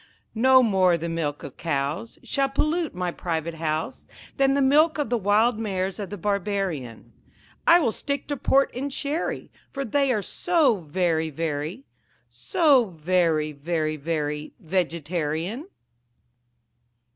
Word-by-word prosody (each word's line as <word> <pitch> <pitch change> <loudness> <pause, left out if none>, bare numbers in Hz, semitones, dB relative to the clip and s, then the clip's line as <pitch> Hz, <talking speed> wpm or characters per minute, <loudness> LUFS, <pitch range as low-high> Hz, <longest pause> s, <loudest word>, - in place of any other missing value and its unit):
No 260 +3 +5
more 190 -6 +3
the 170 +1 -4
milk 165 -3 -3
of 130 - -9
cows 160 +7 -2
Shall 275 -1 0
pollute 305 - -1
my 180 -1 -2
private 165 -1 -3
house 160 -1 -3 0.3
Than 270 0 +3
the - - +2
milk 305 +4 +4
of 290 -6 -2
the 240 - +3
wild 215 +3 +2
mares 190 -3 -2
of 200 -3 -5
the 205 - -6
Barbarian; 195 - -3 0.5
I 340 +1 +8
will 245 -9 +1
stick 280 +4 -3
to 290 - 0
port 275 +1 +2
and 275 +3 -4
sherry, 290 +5 -3 0.2
For 275 -1 -4
they 275 +3 +1
are 215 -4 0
so 310 - +2
very, 160 -1 -1
very, 155 - -3 0.5
So 300 - +3
very, 165 -3 0
very, 155 +1 -2
very 150 -1 -3
Vegetarian. 170 - -2
190 Hz, 135 wpm, -25 LUFS, 160-265 Hz, 0.5 s, I